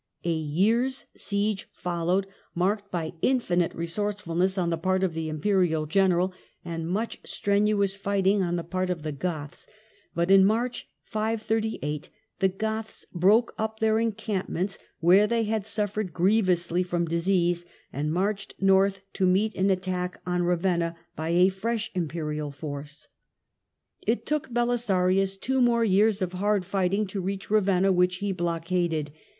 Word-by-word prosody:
A 170 - +1
year's 210 - +1
siege 205 0 -2
followed, 175 +2 -1 0.3
marked 200 +3 0
by 165 -3 -3
infinite 180 -10 +2
resourcefulness 190 +1 -1
on 175 -2 +1
the 165 - 0
part 185 +2 +1
of 185 -3 0
the 160 -1 -3
Imperial 160 -1 +1
general 185 +2 +2 0.3
and 165 -1 -4
much 215 +6 -2
strenuous 200 -1 +1
fighting 200 0 +1
on 175 -1 0
the 170 - -2
part 185 +2 -2
of 170 -4 -3
the 155 - -2
Goths, 150 -1 -5 0.5
but 170 +2 +1
in 195 -1 +8
March, 235 +5 0
538 220 -8 -2 0.3
the 190 -2 +3
Goths 220 +3 -4
broke 205 +7 +4
up 220 0 -2
their 220 0 +3
encampments, 200 -4 -2 0.2
where 185 +5 +6
they 230 +1 +1
had 215 -1 -1
suffered 210 -3 -2
grievously 180 -2 +2
from 175 -1 -1
disease, 175 +1 +1 0.3
and 150 +3 -1
marched 195 +3 -1
north 195 0 +3
to 190 -2 +1
meet 205 +4 +2
an 190 +1 +1
attack 185 -1 -1
on 180 0 0
Ravenna 175 -1 +1 0.2
by 160 +1 -3
a 180 +2 +5
fresh 220 +4 -3
Imperial 155 -4 -3
force. 145 +1 -7 0.9
It 230 +2 -1
took 300 -3 -1
Belisarius 195 -6 +2
two 260 +6 0
more 235 -1 +4
years 205 0 +3
of 180 0 -3
hard 200 +1 +1
fighting 195 +2 0
to 195 0 -4
reach 195 +2 -4
Ravenna, 195 -2 +3
which 180 0 +3
he 200 +2 -2
blockaded. 170 -3 -1
190 Hz, 145 wpm, -26 LUFS, 170-210 Hz, 0.9 s, in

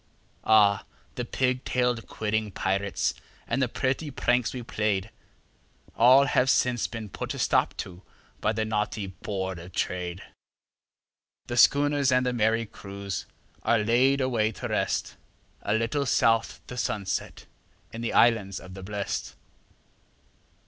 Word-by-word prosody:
Ah! 105 -2 +5 0.3
the 125 - -3
pig 125 +1 0
tailed, 125 -2 0
quidding 110 0 -1
pirates 100 0 -1 0.3
and 120 +4 0
the 130 - +3
pretty 135 +5 -1
pranks 125 -3 +1
we 125 -2 -6
played, 105 -2 -1 0.8
All 130 +4 +7
have 130 -1 +2
since 125 -3 +2
been 115 -2 -6
put 95 - -5
a - - -6
stop - - +1
to 90 0 -12 0.4
by 110 - +1
the 110 0 -1
naughty 105 -1 -1
Board 95 0 -4
of 85 +2 -11
Trade; 90 0 -3 1.2
The 120 - -4
schooners 140 +2 +4
and 125 0 +3
the 125 - 0
merry 115 0 +2
crews 100 -2 -6 0.3
are 115 - +3
laid 125 +6 +3
away 115 -4 +1
to - - -5
rest, - - -1 0.4
A 105 - 0
little 120 +5 0
south 115 -1 +2
the 125 - -8
sunset 100 -5 -3 0.5
in 115 - -6
the 120 - -2
Islands 105 -5 +3
of 90 - -11
the 95 - -8
Blest. 100 +1 -4
110 Hz, 140 wpm, -27 LUFS, 100-125 Hz, 1.2 s, All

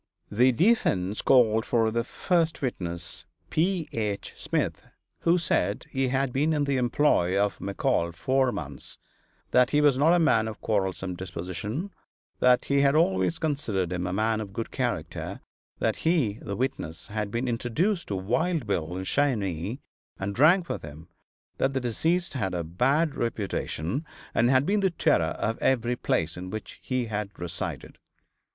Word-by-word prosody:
The 125 +5 +4
defense 110 - +2
called 115 -4 +4
for 115 -2 +1
the 115 +1 0
first 165 +4 0
witness, 85 -8 -4 0.3
P. 175 0 +1
H. 105 -3 -3
Smith, - - -2 0.4
who 170 +1 +3
said 165 -1 0
he 135 -1 +1
had 135 0 0
been 150 +4 +2
in 150 -1 +1
the 140 -1 +1
employ 120 -7 +2
of 100 0 0
McCall 90 -3 0
four 130 +8 +2
months; 75 - -7 0.5
that 125 0 +5
he 150 - +3
was 145 -3 +4
not 155 +4 +5
a - - +4
man 155 -9 +3
of 110 - -6
quarrelsome 95 -3 -1
disposition; 95 - -5 0.5
that 125 -1 +4
he 140 0 +2
had 140 +1 +4
always 95 - +2
considered 110 - -1
him 90 0 -2
a - - -2
man 110 +3 +1
of 100 -2 -7
good 115 +1 -4
character; - - -3 0.4
that - - 0
he 145 - +1
(the 100 - -4
witness) 90 - -3
had 105 -1 -2
been 115 +4 -2
introduced 150 - 0
to 100 - -2
Wild 155 - 0
Bill 90 -4 -2
in 95 - -3
Cheyenne, 105 - 0 0.4
and 100 +1 -3
drank 170 - +5
with - - -3
him; 75 +2 -11 0.5
that 135 - +1
the 135 - +1
deceased 160 +9 0
had 95 -9 -2
a 85 - -1
bad 135 - +1
reputation, 115 - -2 0.3
and 120 - +3
had 130 +1 +4
been 205 +4 +2
the 195 -1 +3
terror 170 - +1
of 115 - -2
every 125 -2 +1
place 80 -8 -1
in 90 +1 -6
which 110 +2 -7
he 130 -2 -1
had 105 -2 -3
resided. 85 -1 -5
115 Hz, 165 wpm, -27 LUFS, 95-145 Hz, 0.5 s, that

